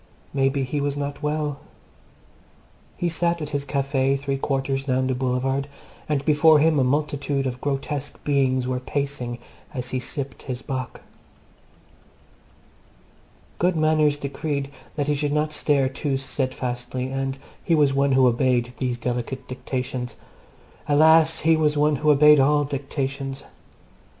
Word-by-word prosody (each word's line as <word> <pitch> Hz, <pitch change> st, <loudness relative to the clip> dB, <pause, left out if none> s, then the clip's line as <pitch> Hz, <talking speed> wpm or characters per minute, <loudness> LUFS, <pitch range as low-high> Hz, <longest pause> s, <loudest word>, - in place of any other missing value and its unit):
Maybe 135 Hz, 0 st, +1 dB
he 140 Hz, +3 st, -2 dB
was 140 Hz, 0 st, -1 dB
not 140 Hz, 0 st, -4 dB
well. 150 Hz, -1 st, -2 dB, 1.4 s
He 175 Hz, -, 0 dB
sat 170 Hz, 0 st, 0 dB
at 150 Hz, -2 st, -4 dB
his 145 Hz, -1 st, -2 dB
Café, 135 Hz, 0 st, +1 dB
three 140 Hz, 0 st, -2 dB
quarters 135 Hz, 0 st, -1 dB
down 130 Hz, -1 st, +1 dB
the 130 Hz, -, 0 dB
Boulevard, 130 Hz, +2 st, -1 dB, 0.4 s
and 145 Hz, -2 st, 0 dB
before 155 Hz, +1 st, +6 dB
him 155 Hz, 0 st, +3 dB
a -, -, +4 dB
multitude 140 Hz, 0 st, 0 dB
of 125 Hz, -1 st, -4 dB
grotesque 140 Hz, 0 st, -3 dB
beings 130 Hz, -3 st, +1 dB
were 130 Hz, 0 st, -1 dB
pacing 130 Hz, -2 st, -3 dB, 0.4 s
as 125 Hz, -1 st, -4 dB
he 130 Hz, -, -1 dB
sipped 130 Hz, -1 st, -5 dB
his 125 Hz, -2 st, -6 dB
bock. 130 Hz, -2 st, -5 dB, 2.6 s
Good 180 Hz, 0 st, +2 dB
manners 155 Hz, -2 st, +3 dB
decreed 140 Hz, 0 st, -3 dB, 0.2 s
that 145 Hz, -2 st, 0 dB
he 150 Hz, -, +2 dB
should 145 Hz, 0 st, -1 dB
not 150 Hz, 0 st, 0 dB
stare 140 Hz, -3 st, +2 dB
too 135 Hz, +1 st, -2 dB
steadfastly, 130 Hz, -1 st, -3 dB
and 135 Hz, 0 st, -2 dB, 0.3 s
he 165 Hz, -, +2 dB
was 145 Hz, -3 st, +3 dB
one 140 Hz, 0 st, +2 dB
who 130 Hz, 0 st, +5 dB
obeyed 125 Hz, 0 st, +1 dB
these 125 Hz, -2 st, -1 dB
delicate 125 Hz, +2 st, -4 dB
dictations. 125 Hz, -1 st, -4 dB, 0.7 s
Alas! 160 Hz, +2 st, +5 dB
he 160 Hz, +1 st, +4 dB
was 150 Hz, -1 st, +1 dB
one 150 Hz, 0 st, +3 dB
who 150 Hz, +3 st, +1 dB
obeyed 150 Hz, 0 st, +7 dB
all 145 Hz, +2 st, +4 dB
dictates. 135 Hz, -1 st, -4 dB
140 Hz, 140 wpm, -24 LUFS, 130-150 Hz, 2.6 s, obeyed